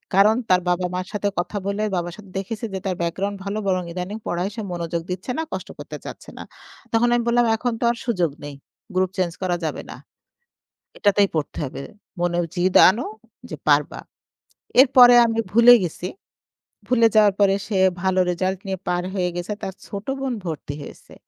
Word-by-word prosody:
কারণ 210 +3 +6
তার 180 0 +4
বাবা 180 +1 +1
মার 185 +1 -3
সাথে 205 -1 -1
কথা 205 +4 -3
বলে 200 +1 -1
বাবার 175 -1 -3
সাথে 200 -3 -14
দেখেছি 225 +4 -5
যে 190 - -2
তার 185 -2 -1
ব্যাকগ্রাউন্ড 195 +4 -2
ভালো 200 +2 -3
বরং 185 -1 +1
ইদানিং 185 +4 -4
পড়ায় 175 +3 -1
সে 225 - -4
মনোযোগ 170 -1 -3
দিচ্ছে 185 +7 -4
না, - - 0
কষ্ট - - -5
করতে - - -7
চাচ্ছে - - -9
না। - - -7 0.5
তখন 230 +2 +3
আমি 240 - +1
বললাম 240 0 +3
"এখন 245 0 -1
তো - - +2
আর 235 - -5
সুযোগ 180 - 0
নেই। 145 - -7 0.4
গ্রুপ 185 0 +2
চেঞ্জ 180 -2 0
করা 175 -1 0
যাবে 155 - -3
না। - - -8 1.0
এটাতেই 205 0 +3
পড়তে 150 -3 -3
হবে। 135 - -7 0.4
মনে 175 0 0 0.2
জিদ 180 +1 +1
আনো 225 +7 -1 0.4
যে - - -5
পারবা।" 145 0 +2 0.8
এরপরে 250 -2 +8
আমি 225 0 -2
ভুলে 235 +3 +8
গেছি। 175 +1 -5 0.8
ভুলে 230 -2 +4
যাওয়ার 210 -2 +6
পরে 200 -1 +4
সে 205 - -1 0.2
ভালো 190 -1 +1
রেজাল্ট 185 +2 -2
নিয়ে 190 -1 -3
পার 175 0 0
হয়ে 180 -2 0
গেছে। 175 +4 -3
তার 190 - -4
ছোট 200 +1 -7
বোন 270 -2 -2
ভর্তি 155 -3 -5
হয়েছে। - - -13
190 Hz, 185 wpm, -22 LUFS, 175-215 Hz, 1.0 s, এরপরে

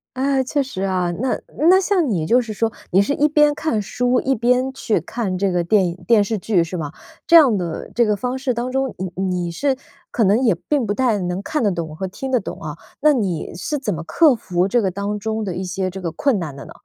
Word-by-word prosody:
哎， 270 +1 +1
确 285 +1 0
实 225 -8 -6
啊。 185 -2 0
那 260 - 0 0.3
那 375 - +7
像 355 -7 +1
你 170 -7 0
就 240 +9 +4
是 225 -3 -6
说， 225 +1 0 0.2
你 190 - +5
是 205 +8 0
一 300 - +3
边 295 -1 +4
看 295 -8 -1
书， 245 +4 0
一 270 - +1
边 250 +3 +1
去 230 -4 -1
看 190 +1 -3
这 195 0 +1
个 175 -1 +1
电 190 +3 +3
影 170 +1 -7
电 225 -3 +5
视 215 +2 -2
剧 185 -3 +1
是 170 +2 -5
吗？ 150 -3 -4 0.4
这 340 - +6
样 275 -10 +7
的 170 -3 -5
这 235 -1 +3
个 210 -1 +1
方 250 +4 -3
式 260 -2 -1
当 240 +2 -3
中， 265 0 -1
你 185 -1 -4
你 180 -2 -1
是 270 +10 0 0.4
可 230 - +1
能 205 +4 +3
也 225 -9 +3
并 280 -7 +1
不 205 - 0
太 235 -3 +1
能 180 0 -3
看 310 -3 -2
得 210 - +3
懂 170 -4 -4
和 190 +4 -4
听 265 +8 -6
得 250 - +3
懂 - - -7
啊。 - - -6 0.2
那 305 - +6
你 195 - -1
是 310 -4 -3
怎 220 -8 -2
么 165 - -5
克 310 - +4
服 185 -4 -1
这 240 +3 +2
个 190 - +1
当 200 +2 -3
中 220 +1 -2
的 190 - -3
一 185 +2 -4
些 185 +1 -2
这 190 +1 -7
个 175 -3 -3
困 240 +3 +1
难 150 -5 -5
的 140 - -9
呢？ - - -12
215 Hz, 275 characters per minute, -20 LUFS, 185-260 Hz, 0.4 s, 那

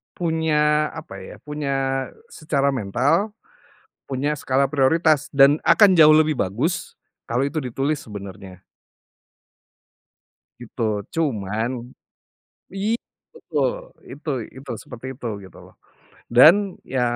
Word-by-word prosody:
punya, 155 -2 +1
apa 155 -11 -9
ya, 95 - -10
punya 135 -3 -2 0.2
secara 140 -3 0
mental, 140 - 0 0.7
punya 140 +3 -2
skala 135 0 +1
prioritas 150 +1 +2
dan 140 +1 +6
akan 200 -4 +6
jauh 155 -1 +8
lebih 155 -2 +3
bagus 125 - -2 0.3
kalau 120 +2 0
itu 140 +3 -3
ditulis 135 +2 -1
sebenarnya. 95 -3 -10 2.0
Gitu. 120 0 -7 0.3
Cuman 110 -8 -1 1.1
iya 220 +4 0 0.3
betul! 470 +1 -1 0.4
Itu 150 +2 -7 0.3
itu 130 -1 -8
seperti 125 0 -11
itu 125 -2 -7 0.2
gitu 95 - -14
loh. - - -19 0.6
Dan, 155 +7 +10 0.4
ya, 130 - +2
140 Hz, 105 wpm, -22 LUFS, 125-155 Hz, 2.0 s, Dan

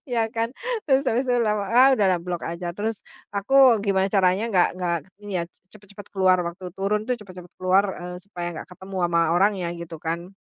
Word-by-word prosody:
Ya, 230 -3 0
kan? 230 +2 -2 0.3
Terus, 270 -2 +3
habis 255 -1 0
itu 250 - +2
lama 210 -2 0
ah, 255 +3 +6
udahlah, 185 -4 +2
blok 175 -1 -4
aja. 170 +1 -4
Terus, 210 +4 -4 0.3
aku 240 +2 +5
gimana 195 -2 +2
caranya 195 +1 +2
nggak 180 - +5
nggak 175 -1 0
k - - -26 0.2
ini 205 - -5
ya, - - -3
c - - -38 0.2
cepet-cepet 205 -1 -13
keluar, 185 -1 +4
waktu 180 +1 -6
turun 210 +2 0
tuh, 250 - 0
cepet-cepet 185 -4 -12
keluar, 185 +2 +3 0.2
eee, 180 - -6
supaya 175 -3 -6
nggak 155 - -8
ketemu 190 +1 -9
ama 170 0 +3
orangnya, 190 -1 +2
gitu 170 -1 -8
kan. 170 +2 -4
195 Hz, 200 wpm, -24 LUFS, 180-215 Hz, 0.3 s, ah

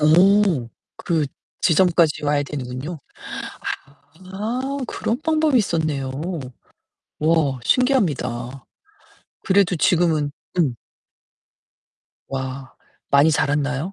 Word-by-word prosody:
어 175 - +4 0.3
그 160 -4 0 0.3
지점까지 170 -3 +3
와야 145 0 +2
되는군요. 140 +3 -5 1.4
아, 220 +6 -2 0.3
그런 235 +6 -2
방법이 315 -4 +2
있었네요. 155 -8 -1 1.1
와 155 -4 +2
신기합니다. 135 - +1 0.8
그래도 190 -2 +3
지금은 160 -3 +2 0.3
음. 145 -8 +2 1.6
와, 130 0 -5 0.4
많이 140 +3 +5
자랐나요? 145 +3 0
155 Hz, 180 characters per minute, -22 LUFS, 140-190 Hz, 1.6 s, 많이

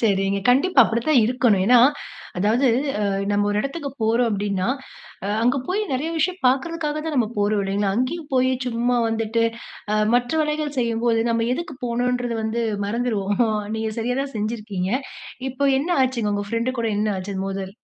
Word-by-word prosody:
சரிங்க. 195 -2 +1
கண்டிப்பா 275 +4 +5
அப்படிதான் 235 +4 +2
இருக்கணும். 230 -5 +2
ஏன்னா, 245 0 +7 0.6
அதாவது 225 +8 +2 0.3
அ - - 0 0.3
நம்ம 205 0 +2
ஒரு 205 - 0
இடத்துக்கு 280 +1 -4
போறோம் 230 +2 +2
அப்படின்னா, 200 0 -1 0.6
அ - - -2 0.2
அங்க 250 +3 +3
போயி 400 +4 0
நெறைய 295 +6 -1
விஷயம் 365 +4 0
பாக்கறதுக்காக 300 +3 0
தான் 315 - -2
நம்ம 230 -4 +2
போறோம் 205 0 +2
இல்லைங்களா? 195 0 0
அங்கயும் 290 +5 -2
போயி 255 0 +3 0.2
சும்மா 245 +1 0
வந்துட்டு 225 +1 0 0.5
அ - - +2 0.2
மற்ற 245 0 +1
வேலைகள் 300 -1 -2
செய்யும்போது, 230 -1 +1
நம்ம 230 0 +1
எதுக்கு 340 -4 -6
போனொன்றது 245 0 -1
வந்து 225 +2 -1 0.2
மறந்துருவோம். 210 -3 -1 0.4
நீங்க 220 0 -2
சரியா 245 +3 -1
தான் 275 -3 -7
செஞ்சிருக்கீங்க. 210 -3 -3 0.6
இப்ப 275 +2 +1
என்ன 320 +6 -2
ஆச்சுங்க? 235 -5 0
உங்க 205 - -2
பிரெண்ட்டு 235 +2 -1
கூட 230 - 0
என்ன 215 0 +1
ஆச்சு 190 +1 -5
மோதல்? 195 0 -4
235 Hz, 160 wpm, -22 LUFS, 210-260 Hz, 0.6 s, ஏன்னா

